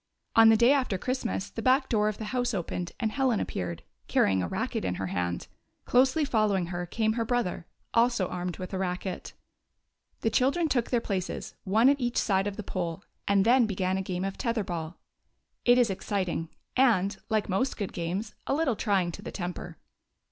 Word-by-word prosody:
On 225 0 +8
the 225 - +6
day 240 +3 +6
after 255 -8 +1
Christmas 95 - -2
the - - -5
back 265 +1 +3
door 210 -2 +2
of 215 - -5
the 220 - -5
house 245 -3 0
opened 175 -1 -3
and 220 -2 0
Helen 255 -2 +1
appeared, 90 -2 -4 0.2
carrying 95 -1 +3
a 90 - -1
racket - - -2
in 90 -1 -1
her 95 - -3
hand; 90 -1 -2 0.4
closely 260 +5 +3
following 215 -7 +2
her 175 0 -3
came 220 +4 0
her 230 0 0
brother, 225 -8 -1 0.3
also 235 -5 +3
armed 180 -1 -4
with 185 +1 -7
a 190 - -1
racket. 180 0 -3 0.9
The 225 - +1
children 280 +9 +2
took 245 -6 0
their 240 -2 +2
places, 190 -5 -3
one 220 +6 +4
at 280 0 +4
each 240 0 -1
side 195 -1 +2
of 205 - -4
the 215 - -4
pole, 180 0 -3 0.2
and 200 0 +4
then 240 0 +5
began 185 -2 -1
a 190 - 0
game 185 0 -3
of 195 - -4
tetlier 230 -5 0
ball. 170 -2 -5 0.7
It 245 0 +6
is 240 -4 +4
exciting, 185 -4 -2 0.3
and, 220 -7 +3
like 215 -1 +1
most 200 +8 0
good 200 -3 -4
games, 185 +6 -3
a - - +2
little 295 -6 +1
trying 195 -5 +1
to - - -9
the - - -7
temper. 175 -2 -5
205 Hz, 195 wpm, -28 LUFS, 180-240 Hz, 0.9 s, On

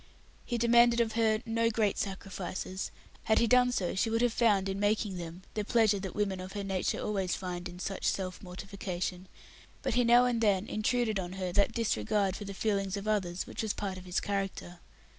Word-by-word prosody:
He 240 - -1
demanded 235 0 +5
of 230 -1 +2
her 220 0 +2
no 230 0 +1
great 215 -3 +1
sacrifices 190 -1 -4 0.4
had 220 - +3
he 235 - +4
done 250 +1 +5
so 185 -8 -1
she 210 +4 +1
would 225 +1 +1
have 240 -2 +2
found, 205 -5 +3
in 195 0 -2
making 205 -2 +1
them, 170 +1 -7
the 210 - -1
pleasure 215 -2 +3
that 190 -2 -6
women 195 -3 0
of 185 +1 -7
her 205 -1 -3
nature 190 -2 -1
always 195 -4 -1
find 180 -1 -5
in 175 - -10
such 190 +1 -4
self 185 -1 -1
mortification 185 -1 -5 0.6
but - - 0
he 245 +1 +3
now 240 +1 +6
and 240 -2 +1
then 200 -3 +3
intruded 220 -1 0
on 180 -1 -4
her 185 -2 -3
that 200 +4 +2
disregard 200 - 0
for 205 - -6
the 200 0 -6
feeling 200 -2 0
of 200 +1 -6
others 190 -4 0
which - - -5
was 220 -2 -1
part 195 -2 -4
of 185 - -12
his 180 0 0
character. 195 -3 -3
200 Hz, 205 wpm, -31 LUFS, 185-225 Hz, 0.6 s, now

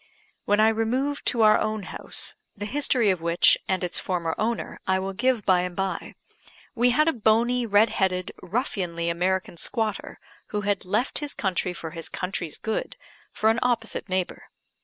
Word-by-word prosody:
When 205 +1 +2
I 220 +1 +6
removed 250 +6 -1
to 230 -2 +3
our 215 0 +6
own 215 -1 -2
house, - - 0 0.2
the 205 - -4
history 245 -3 +2
of 180 -3 -2
which, 170 +1 +5
and 190 -1 0
its 180 - 0
former 170 -3 -2
owner, 230 +1 -2
I 190 - +3
will 190 +1 -3
give 245 0 +1
by 185 -2 +4
and 180 -1 -4
by, 195 0 -3 0.6
we 245 -1 +3
had 305 +6 +3
a 325 - +3
bony, 235 +2 +2
red 205 +1 +4
headed, 185 -2 0
ruffianly 180 -5 -2
American 180 +1 -1
squatter, 220 +3 -3 0.3
who 210 - -2
had 205 -2 -1
"left 215 +8 0
his 295 -1 -4
country 185 -2 -1
for 165 -2 -7
his 165 0 -6
country's 180 -4 -4
good," 220 -1 -3 0.4
for 220 +1 +2
an 225 - 0
opposite 235 -4 -1
neighbour. 185 -1 -2
205 Hz, 175 wpm, -25 LUFS, 185-230 Hz, 0.6 s, I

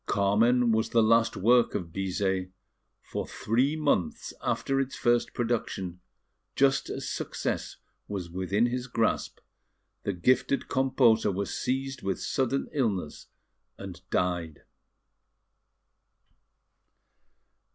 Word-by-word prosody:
Carmen 115 +5 +3
was 110 +1 +1
the 115 -1 +4
last 115 +1 +3
work 120 +4 +4
of 85 -2 -4
Bizet; 95 -1 -1 0.5
for, - - -5
three 130 +7 0
months 145 - 0
after 135 0 0
its 135 -1 -2
first 120 -1 +1
production, 105 -7 -2 0.6
just 135 -1 +2
as - - -4
success - - -3 0.3
was 95 -4 -4
within 95 +5 0
his 125 +1 -2
grasp, 115 -2 0 0.6
the - - -1
gifted 130 +8 +1
composer 130 -5 +3
was 100 +1 -3
seized 135 +1 -2
with 95 -3 -2
sudden 135 0 -1
illness 105 - -2 0.5
and - - -9
died. 85 -4 -1
115 Hz, 105 wpm, -28 LUFS, 95-125 Hz, 0.6 s, the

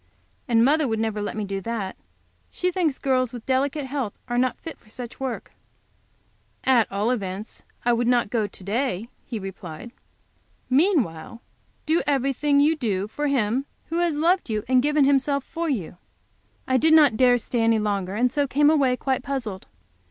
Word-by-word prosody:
And 230 -1 +4
mother 300 +1 +3
would 220 -2 -1
never 220 -1 -1
let 205 - -4
me 215 - -2
do 195 0 -4
that. 205 -2 -4 0.5
She 360 0 -1
thinks 335 -6 0
girls 255 -3 +1
with 240 -2 -8
delicate 270 +2 0
health 265 -6 -3
are 240 0 0
not 255 0 +1
fit 325 - -9
for 215 - -24
such 240 +1 -9
work." 260 -3 -4 1.1
"At 250 -4 +3
all 205 +4 0
events 200 -2 -4 0.2
I 240 - +4
would 235 0 +1
not 240 -4 +2
go 220 -4 +1
to 190 - -13
day," 225 +1 -2 0.2
he 235 - -5
replied. 195 +1 -8 0.8
"Meanwhile 255 - +1 0.5
do 320 +2 +2
everything 280 +1 +2
you 305 +3 +4
do 205 -8 -1
for 295 +7 -3
Him 260 0 0 0.2
who 335 +1 -1
has 345 -3 +1
loved 340 +1 +2
you 215 -1 -1
and 255 0 +4
given 295 0 +3
Himself 280 0 +2
for 335 +2 -4
you." 195 - -3 0.7
I 260 - +3
did 315 +4 +5
not 295 -8 +6
dare 245 +1 +5
to 240 - -3
stay 240 - -1
any 225 0 +3
longer, 200 -3 -1
and 245 +3 +1
so 285 -1 +1
came 290 +3 +4
away 270 -5 +2
quite 265 0 -1
puzzled. 240 -9 -4
250 Hz, 180 wpm, -24 LUFS, 215-285 Hz, 1.1 s, not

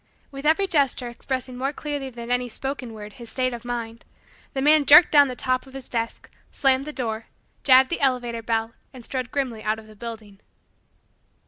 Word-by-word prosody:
With 275 +1 -4
every 325 +6 +4
gesture 280 -8 +1
expressing 255 +1 -4
more 265 +3 -1
clearly 290 -2 -4
than 235 -1 -7
any 245 0 0
spoken 265 0 -5
word 210 -1 -9
his 235 +1 -10
state 255 -1 -1
of 235 -1 -7
mind, 235 -1 -5 0.5
the 270 - -2
man 300 +1 +5
jerked 300 +5 +8
down 285 -2 +7
the 255 - -5
top 255 +1 -1
of 265 - -14
his 270 -2 -3
desk, 230 -1 -4 0.2
slammed 270 0 +3
the 300 - -5
door, 225 -5 -4 0.4
jabbed 260 +1 +6
the 340 - -1
elevator 245 -4 0
bell, 225 0 -1 0.2
and 250 -3 -11
strode 255 -2 -3
grimly 255 -6 -2
out 215 0 -1
of 220 - -12
the 215 0 -15
building. 215 -3 -9
255 Hz, 195 wpm, -24 LUFS, 230-275 Hz, 0.5 s, jerked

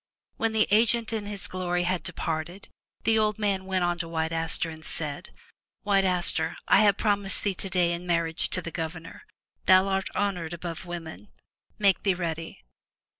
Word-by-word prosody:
When 225 0 +1
the 220 -1 +3
agent 230 +1 +3
in 210 -2 -3
his 205 -1 -6
glory 180 -1 -1
had 180 0 0
departed, 165 +4 -4 0.3
the 220 -1 +3
old 215 -1 +1
man 200 -3 0
went 190 -1 0
unto 175 -1 -1
White 160 0 -1
Aster 165 0 0
and 160 0 -11
said: 150 -3 -5 0.5
"White 200 -2 +3
Aster, 175 -2 +2
I - - +6
have 205 -1 +5
promised 200 -3 +1
thee 200 - +1
today 180 -2 0
in 175 +1 -5
marriage 165 -1 +1
to 185 - -1
the 170 - -5
Governor. 165 - -6 0.4
Thou 185 0 +7
art 195 0 -1
honored 180 -5 -1
above 170 +1 -6
women. 175 +3 -7 0.5
Make 200 -3 +3
thee 195 -2 +2
ready. 165 - -5
180 Hz, 170 wpm, -27 LUFS, 165-200 Hz, 0.5 s, Thou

